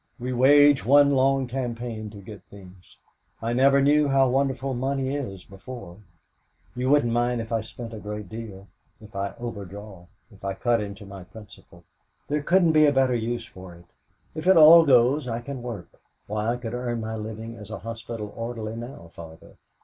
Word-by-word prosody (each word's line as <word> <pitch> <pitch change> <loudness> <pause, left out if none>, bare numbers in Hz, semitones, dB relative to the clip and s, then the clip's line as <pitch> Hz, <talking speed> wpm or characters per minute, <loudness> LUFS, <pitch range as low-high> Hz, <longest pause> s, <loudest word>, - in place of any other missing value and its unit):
We 125 +1 -3
wage 145 +2 +5
one 140 +3 +5
long 135 0 +2
campaign 120 -3 -5
to 100 -1 -12
get 100 -1 -11
things. 95 -2 -16 0.4
I 115 +1 -2
never 135 +2 +4
knew 145 +1 +4
how 135 -1 +3
wonderful 135 0 0
money 135 +1 -2
is 100 -11 -6
before. 100 -2 -11 0.8
You 125 +1 -1
mustn't 140 -5 +3
mind 120 0 0
if 115 0 -6
I 115 -1 0
spend 115 +1 -9
a 110 - -7
great 105 -1 -7
deal 100 -2 -9 0.3
if 105 -2 -16
I 100 0 -3
overdraw 100 -5 -8 0.2
if 100 - -19
I 100 -1 -3
cut 120 +1 +1
into 100 0 -7
my 100 -1 -10
principal. 100 -4 -15 0.5
There 150 +1 0
couldn't 170 +2 +3
be 155 -1 +6
a - - +4
better 135 -2 +2
use 120 0 -2
for 90 -2 -12
it. 85 +1 -17 0.5
If 155 +2 -5
it 190 -2 +6
all 165 +1 +9
goes 130 +2 +4
I 115 -1 -3
can 130 +1 -7
work. 115 -7 -9 0.2
Why, 105 +1 -3
I 120 - -2
could 120 -2 -6
earn 120 -1 -3
my 110 0 -4
living 110 +1 -7
as 105 -2 -11
a 110 - -5
hospital 115 -2 -7
orderly 115 -1 -5
now, 115 -7 -9
Father. 80 -1 -13
115 Hz, 185 wpm, -25 LUFS, 105-135 Hz, 0.8 s, all